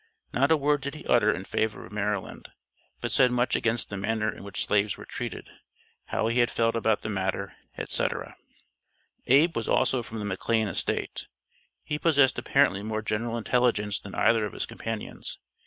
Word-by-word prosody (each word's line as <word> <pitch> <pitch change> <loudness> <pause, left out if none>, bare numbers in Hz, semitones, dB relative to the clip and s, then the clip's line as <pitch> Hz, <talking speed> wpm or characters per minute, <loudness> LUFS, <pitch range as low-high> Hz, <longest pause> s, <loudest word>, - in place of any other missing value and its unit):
Not - - +3
a 160 - +5
word 145 0 +2
did 140 +2 -4
he 155 - -10
utter 105 -3 +4
in 95 - -4
favor 110 +2 -2
of - - -14
Maryland, 105 -1 -3 0.5
but - - -2
said 125 - +5
much 125 0 +1
against 115 -1 0
the 100 - -3
manner 110 +2 -1
in - - -11
which 100 -1 -2
slaves 105 0 +1
were - - -10
treated, - - -6 0.6
how - - -1
he 115 +2 +1
had 120 -1 +4
felt 115 0 +1
about 110 -2 +1
the - - -3
matter, 95 0 -2 0.2
etc. - - -1 0.9
Abe 150 +5 +5
was 115 - -2
also 130 - +3
from 115 -1 -8
the 105 - -4
McLane 110 +3 0
estate. 95 - -2 0.6
He 150 - -3
possessed 145 -7 +4
apparently 125 -5 +2
more 110 +1 -3
general 115 +2 -1
intelligence 115 -3 +1
than 100 - -9
either 115 -2 +3
of 105 - -3
his - - -2
companions. 115 -2 -6
115 Hz, 180 wpm, -27 LUFS, 105-125 Hz, 0.9 s, a